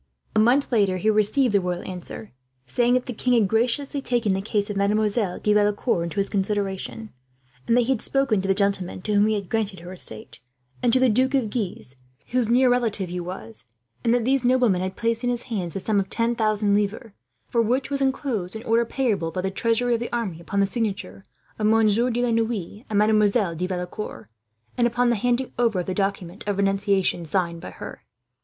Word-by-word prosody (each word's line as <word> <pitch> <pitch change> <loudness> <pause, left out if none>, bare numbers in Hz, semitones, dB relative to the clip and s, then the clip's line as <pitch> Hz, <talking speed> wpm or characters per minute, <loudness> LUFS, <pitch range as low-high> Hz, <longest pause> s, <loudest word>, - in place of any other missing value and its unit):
A - - +4
month 250 +6 +3
later 200 -5 +2
he 215 +4 +2
received 215 +4 +2
the 200 - +4
royal 180 0 -3
answer, 185 +3 -8 0.3
saying 240 - +2
that 255 - 0
the 250 - -4
king 250 +3 0
had 220 -4 +4
graciously 250 +6 0
taken 240 -6 +1
the 190 - -1
case 205 0 -1
of - - -5
Mademoiselle 205 0 +1
de 210 - +2
Valecourt 205 -3 +1
into 170 - -6
his 200 - +1
consideration, 200 +1 -2 0.6
that 240 +1 +4
he - - 0
had 255 - 0
spoken 270 -7 +1
to 195 - -3
the - - +2
nobleman 195 -2 -1
to 210 - -1
whom 205 +1 +4
he 220 - +1
had 200 -3 -4
granted 215 -2 -1
her 180 +2 -8
estate, 115 -8 -8 0.4
and 235 - +3
to 260 - +4
the 260 - +4
Duke 255 +4 +2
of 235 -6 0
Guise, 185 - -4 0.3
whose 245 -3 +1
near 250 +2 +4
relative 225 -6 +1
he 180 +1 -4
was; 115 - -7 0.4
and 230 - +2
that 240 -1 +2
these 265 0 +2
noblemen 245 -7 +3
had 185 0 -3
placed 230 0 -1
in 245 - +1
his 245 0 -2
hands 185 -8 -4
the - - -1
sum 205 +2 +1
of 195 - -2
ten 230 +1 +1
thousand 215 -3 +1
livres, 210 +2 -1 0.4
for 235 - +3
which 250 +5 0
was 280 0 0
enclosed 255 -8 -1
an 220 - -6
order, 230 +1 +2
payable 220 -10 -1
by 185 +2 -3
the 190 +1 -2
treasury 230 +4 +1
of 230 - +1
the 240 - -5
army 205 -9 -3
upon 200 +3 -2
the 200 - +4
signatures 205 -3 -3 0.4
of 215 - +2
Monsieur 225 +2 +3
de 245 0 0
la 240 - 0
Noue 225 -3 -2
and 210 - 0
Mademoiselle 210 -2 +3
de 180 +3 -2
Valecourt, 180 +3 -5 0.5
and 240 - +5
upon 245 +1 +1
the - - +2
handing 245 +4 0
over 225 -6 +2
of - - -7
the 185 - -2
document 195 -2 -2
of 205 -1 0
renunciation 195 -2 +1
signed 170 0 -1
by - - -7
her. - - -9
215 Hz, 215 wpm, -24 LUFS, 195-240 Hz, 0.6 s, and